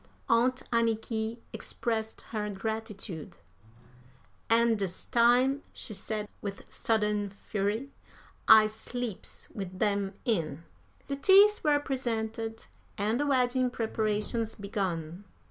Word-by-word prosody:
Aunt 245 +2 +3
Anniky 225 0 0 0.2
expressed 220 -2 -3
her 210 -2 -2
gratitude. 210 -4 -4 1.1
"An' 230 0 +4
dis 195 -4 -3
time," 245 +4 +4
she 215 - -5
said, 210 +1 -3
with 200 -2 -5
sudden 210 -2 +1
fury, 205 +6 -3 0.6
"I 220 -1 +9
sleeps 220 0 -5
wid 185 -2 -6
'em 200 -2 0
in." 165 - 0 0.4
The 275 - -3
teeth 400 +7 +6
were 295 -2 +4
presented, 225 -4 -3 0.3
and 215 +4 +1
the 290 - +1
wedding 255 -1 +2
preparations 220 0 -1
began. 185 -4 -3
220 Hz, 105 wpm, -30 LUFS, 205-240 Hz, 1.1 s, I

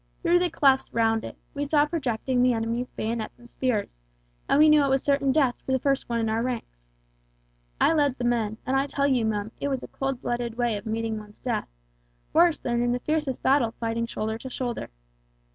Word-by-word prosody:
Through 350 0 +4
the 355 0 +1
clefts 275 -4 +3
round 225 -1 +2
it, - - -8 0.2
we 285 - -2
saw 290 0 +3
projecting 260 -5 -1
the 250 0 +4
enemy's 230 +2 -2
bayonets 220 0 -4
and 240 - -15
spears, 225 - -2 0.5
and - - +4
we 305 +1 +7
knew 305 -1 +6
it 275 - +1
was 270 0 +2
certain 280 -1 +2
death 265 -3 +3
for - - -4
the - - +4
first 275 0 0
one 235 -1 0
in 225 - 0
our 220 +1 0
ranks. 225 - -5 0.9
I - - +4
led 285 -4 +2
the 245 - -4
men, 225 -3 0
and 260 +1 0
I 270 +1 +2
tell 280 0 0
you, 255 -5 +2
Mum, 215 0 -2
it - - 0
was 270 -2 -2
a - - -6
cold 270 -2 -3
blooded 240 -1 -2
way 240 -2 +1
of 205 +2 -6
meeting 225 0 -2
one's 210 0 -13
death, 245 -3 -2 0.7
worse 335 -1 +5
than 240 -1 -1
in 240 0 +1
the 250 - -1
fiercest 300 -2 -2
battle 260 -4 +3
fighting 230 0 -1
shoulder 220 -1 -3
to 260 - -7
shoulder! 245 -2 -4
245 Hz, 215 wpm, -26 LUFS, 225-275 Hz, 0.9 s, we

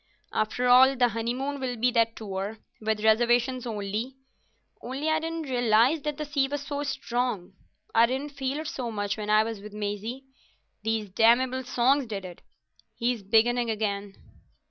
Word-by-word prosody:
"After 245 +3 0
all, 260 +2 +7
the 245 -1 +3
honeymoon 245 +6 -3
will 255 -2 -2
be 245 +2 +2
that 230 -1 +2
tour—with 215 +1 -4
reservations; 240 +3 +3
only... 215 +4 -3 0.7
only 270 +5 -3
I 315 - +2
didn't 325 0 -4
realise 245 +2 +3
that 300 0 -3
the 305 - -3
sea 280 -2 +1
was 285 0 -4
so 285 -1 -3
strong. 240 -9 -2 0.4
I 230 +1 +6
didn't 270 +4 -3
feel 275 +1 -3
it 315 - -6
so 250 -5 -4
much 205 -2 -2
when 210 -1 -5
I 215 0 +5
was 225 -2 -5
with 210 +1 -10
Maisie. 210 +5 -4 0.6
These 220 -1 -1
damnable 240 +5 +3
songs 255 +2 +2
did 200 -3 -5
it. 180 -1 -10 0.5
He's 240 -2 -1
beginning 230 +4 +2
again." 205 -2 -2
240 Hz, 160 wpm, -27 LUFS, 215-265 Hz, 0.7 s, all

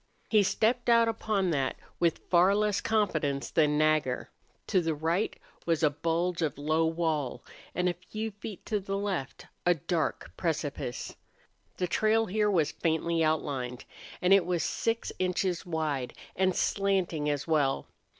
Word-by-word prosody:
He 215 -2 +6
stepped 235 +5 +1
out 230 -1 +6
upon 215 -4 0
that 135 -4 0 0.2
with 170 -2 +1
far 180 +3 +5
less 210 -1 +1
confidence 155 -11 0
than 150 -2 +3
Nagger. 155 -4 +1 0.3
To 190 -4 +2
the 165 -2 -1
right 165 +7 0 0.3
was 165 -1 +1
a 150 - +5
bulge 170 +3 -1
of 150 -5 -1
low 155 +3 +1
wall, 160 -5 -1 0.3
and 180 +1 +1
a 180 - +2
few 215 +6 -5
feet 205 -1 -9
to 210 - 0
the 195 0 -3
left 190 -9 -3 0.2
a 175 0 +4
dark 165 +2 -2
precipice. 150 -7 -3 0.6
The 180 - 0
trail 220 +4 +2
here 210 +1 +1
was 165 -7 +2
faintly 165 0 0
outlined, 135 -6 -1 0.4
and 180 +2 +6
it 195 -3 +5
was 175 -2 0
six 230 0 -1
inches 185 -1 0
wide 155 -6 -2 0.2
and 185 -1 +2
slanting 185 -7 +1
as 145 -1 -1
well. 145 -4 +1
170 Hz, 150 wpm, -29 LUFS, 155-195 Hz, 0.6 s, He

